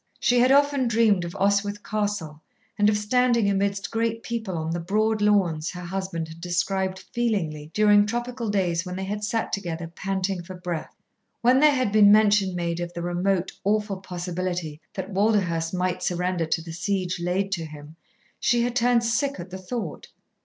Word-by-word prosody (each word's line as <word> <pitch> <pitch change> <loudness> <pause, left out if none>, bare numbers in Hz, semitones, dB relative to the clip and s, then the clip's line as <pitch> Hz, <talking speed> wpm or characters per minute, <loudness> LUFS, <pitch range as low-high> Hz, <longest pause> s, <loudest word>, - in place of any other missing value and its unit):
She 245 0 +3
had 250 +2 +5
often 280 -2 +4
dreamed 220 -6 +3
of 170 - -7
Oswyth 205 +1 +1
Castle 205 -8 -3 0.3
and 210 0 +4
of 210 - +2
standing 235 +1 +2
amidst 200 0 0
great 230 0 -1
people 220 -7 -3
on 160 0 -3
the 170 - -2
broad 215 +5 0
lawns 185 -7 +2
her 180 0 -7
husband 185 -3 -3
had 160 +1 -12
described 190 +2 -1
feelingly 170 -11 -1
during 210 -1 +5
tropical 240 0 -3
days 175 -5 +1
when 180 -1 -6
they 190 - -4
had 205 +2 -4
sat 225 +2 -1
together 170 -4 -3
panting 190 +2 -3
for 185 +2 -9
breath. 175 -3 -5 0.5
When 250 +2 +5
there 300 0 +5
had 255 -6 0
been 205 -1 +7
mention 205 -3 +4
made 170 -1 -2
of 175 0 -4
the 170 - -5
remote, 180 +1 0
awful 210 0 0
possibility 180 -3 -4
that 190 +1 -5
Walderhurst 190 -5 +1
might 180 0 -1
surrender 180 -1 -1
to 160 +1 -1
the 165 -1 -8
siege 180 0 -2
laid 185 +3 -1
to 170 -4 -2
him, 150 0 -11 0.4
she 240 0 +2
had 245 0 -2
turned 245 -1 +3
sick 245 +2 0
at 175 +1 -8
the 190 - -6
thought. 185 -2 -5
195 Hz, 180 wpm, -25 LUFS, 175-215 Hz, 0.5 s, been